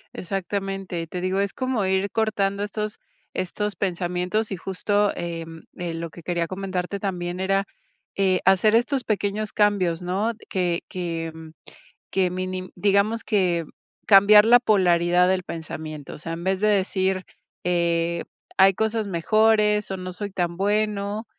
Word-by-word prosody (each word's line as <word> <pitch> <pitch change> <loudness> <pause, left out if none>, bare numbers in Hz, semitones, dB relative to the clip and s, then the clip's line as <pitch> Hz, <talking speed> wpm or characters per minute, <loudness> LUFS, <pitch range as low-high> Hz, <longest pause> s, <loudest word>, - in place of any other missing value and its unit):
Exactamente. 195 -1 -3
Y 165 - -6
te 180 - -5
digo, 185 +2 0
es 200 0 -2
como 255 -6 -1
ir 190 +1 +1
cortando 205 -2 0
estos 210 +1 -4 0.3
estos 210 +3 -2
pensamientos. 180 +3 -1
Y - - -2
justo, 205 +3 0
em, 165 -1 -6
eh, 175 -2 -3
lo 165 0 -4
que 170 - -12
quería 170 0 -1
comentarte 190 0 -3
también 180 -2 -3
era, 195 +1 +1 0.5
eh, 190 -2 +2
hacer 195 +3 +5
estos 260 +2 0
pequeños 210 -1 -1
cambios, 195 -5 +2
¿no? 190 +6 0 0.2
Que 175 -2 0
que 165 -3 -4 0.8
que 190 -2 +2
mini 185 0 -4
digamos 200 +4 +2
que 180 -5 +1 0.4
cambiar 210 +1 +8
la 240 +2 +7
polaridad 180 -4 +3
del 185 -1 +1
pensamiento. 155 -3 -7
O - - -8
sea, 165 +2 -6
en 170 +1 -6
vez 190 +1 0
de 215 - +4
decir: 190 -1 +1 0.4
"Eh, 170 -1 +1 0.3
hay 195 0 +7
cosas 220 +1 -1
mejores", 210 +3 +3
o 190 - -2
"no 185 0 -6
soy 200 +2 -5
tan 175 -2 -2
bueno", 205 +2 -1
190 Hz, 150 wpm, -24 LUFS, 175-205 Hz, 0.8 s, cambiar